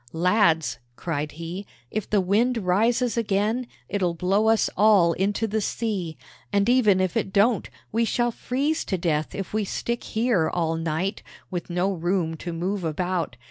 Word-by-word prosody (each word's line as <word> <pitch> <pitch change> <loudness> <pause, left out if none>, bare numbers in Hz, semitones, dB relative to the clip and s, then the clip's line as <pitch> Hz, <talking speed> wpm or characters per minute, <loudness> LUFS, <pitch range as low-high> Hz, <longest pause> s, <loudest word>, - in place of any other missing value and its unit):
"Lads," 165 - +2 0.2
cried 150 -1 -3
he, 170 +5 -6 0.2
"if 215 -2 -3
the 210 - +3
wind 225 +7 +2
rises 225 +5 +1
again, 220 +3 0 0.2
it'll 180 -4 0
blow 195 +6 +2
us 225 -1 +3
all 200 -5 +5
into 200 +5 0
the 220 0 -1
sea; 195 -8 -2 0.3
and 200 0 +2
even 230 -6 +4
if 185 -2 0
it - - 0
don't, 210 +3 +2 0.2
we 230 +2 +2
shall 240 +1 +1
freeze 280 +7 -1
to 190 - -1
death 155 -3 -1
if 195 0 -5
we 215 0 +1
stick 235 +4 -3
here 220 -8 +1
all 165 -2 0
night, 165 +4 -2 0.3
with 175 -1 -4
no 180 +3 0
room 175 -1 -1
to 175 - -5
move 180 +4 -2
about. 170 -4 -2
195 Hz, 165 wpm, -25 LUFS, 170-220 Hz, 0.3 s, all